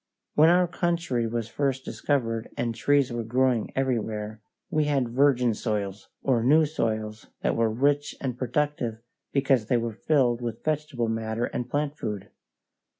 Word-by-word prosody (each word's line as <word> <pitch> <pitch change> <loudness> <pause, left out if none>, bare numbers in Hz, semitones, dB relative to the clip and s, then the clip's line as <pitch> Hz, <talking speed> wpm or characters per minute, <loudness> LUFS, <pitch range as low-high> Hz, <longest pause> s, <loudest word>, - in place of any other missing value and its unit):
When 155 +2 +6
our 180 +1 +4
country 170 -9 0
was 115 -1 -2
first 135 +2 -1
discovered 115 -5 -1
and 115 -1 -1
trees 135 +3 +2
were 120 -1 -2
growing 125 0 +1
everywhere, 110 -5 -2 0.3
we 155 -1 +2
had 135 -5 +1
virgin 125 -2 +3
soils, 105 -3 -3
or 125 -4 +2
new 155 +5 +5
soils 110 -7 -2 0.2
that - - +1
were 115 -1 +2
rich 145 +6 +1
and 130 -3 -3
productive 125 -3 -1 0.3
because 135 -5 +2
they 125 - +3
were 115 -1 -2
filled 125 -1 +2
with 120 -2 -5
vegetable 150 -6 -1
matter 110 +1 -1
and 125 0 -4
plant 145 +2 -1
food. 105 -2 -4
125 Hz, 150 wpm, -26 LUFS, 115-145 Hz, 0.3 s, When